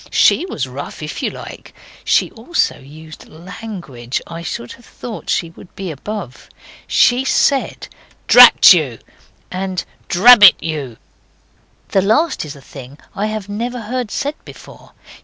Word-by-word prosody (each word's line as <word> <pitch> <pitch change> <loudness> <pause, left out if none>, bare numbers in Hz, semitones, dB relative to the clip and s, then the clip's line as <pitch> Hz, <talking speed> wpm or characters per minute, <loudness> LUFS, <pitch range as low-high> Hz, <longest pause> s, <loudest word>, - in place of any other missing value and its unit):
SHE 365 - +2
was 135 - -4
rough 140 +4 -8
if 150 - -6
you - - -1
like. - - -11 0.3
She - - +1
also 245 +11 -2
used 155 +3 -14
language 170 - -7
I 165 0 -8
should 120 -7 -6
have 240 - -14
thought 230 -3 -9
she 165 -2 -1
would 175 - -17
be 190 -3 -6
above. 160 - -8 0.4
She 250 +2 +3
said, 270 0 0 0.4
Drat 245 -5 +8
you!' 145 -10 -1 0.5
and 185 -1 -4 0.2
'Drabbit 205 +1 +8
you!' 145 -8 -5 0.9
The 195 - +2
last 225 - 0
is 150 0 -9
a 140 - -15
thing 135 +1 -12 0.2
I 205 +2 -2
have 215 -2 -5
never 235 +4 -5
heard 245 +1 -4
said 285 +7 -3
before. - - -15
185 Hz, 140 wpm, -17 LUFS, 150-225 Hz, 0.9 s, Drat